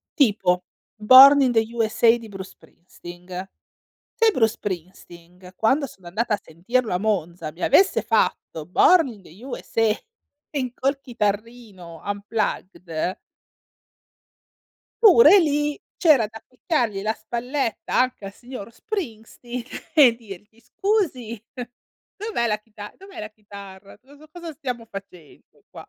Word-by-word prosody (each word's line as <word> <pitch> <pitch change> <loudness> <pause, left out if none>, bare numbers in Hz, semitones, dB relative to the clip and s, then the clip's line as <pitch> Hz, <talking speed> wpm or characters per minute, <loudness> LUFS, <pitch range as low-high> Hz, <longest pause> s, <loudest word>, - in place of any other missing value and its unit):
Tipo 195 - +2 0.3
"Born 260 +6 +8
in 260 -2 +3
the 225 -2 +3
USA" 230 0 +3
di 230 -1 -11
Bruce 190 -2 -9
Springsteen. 175 0 -15 0.9
Se 455 -1 +4
Bruce 225 - +2
Springsteen, 180 -1 -9
quando 275 +8 +2
sono 190 -8 -17
andata 215 +5 -1
a 205 - -4
sentirlo 220 +9 -2
a 180 - +1
Monza 175 -6 -2
mi 170 - -13
avesse 380 +7 +4
fatto 155 -2 -1
"Born 325 - +4
in 215 -5 -11
the 185 +7 -16
USA" 225 -4 -1 0.9
col 275 +1 0
chitarrino, 210 -6 -5
unplugged 200 -4 -3 1.9
pure 420 0 +8
lì, 295 -2 0 0.2
c'era 290 - +4
da 220 +1 -12
ficcargli 245 - -2
la 215 +2 0
spalletta 235 +2 -4
anche 255 -5 0
al 195 - -8
signor 240 -2 -10
Springsteen, 240 - -7
e 270 -6 +7
dirgli: 215 0 -13
"Scusi, 255 - -2 0.7
dov'è 415 - -2
la 210 -2 0
chita 210 -1 -12
dov'è 390 -1 -13
la 215 - -6
chitarra? 200 -2 -13
Cosa 285 +5 -19
cosa 340 0 -8
stiamo 250 -5 -6
facendo 195 -7 -13
qua?" - - -12
225 Hz, 125 wpm, -23 LUFS, 195-265 Hz, 1.9 s, Born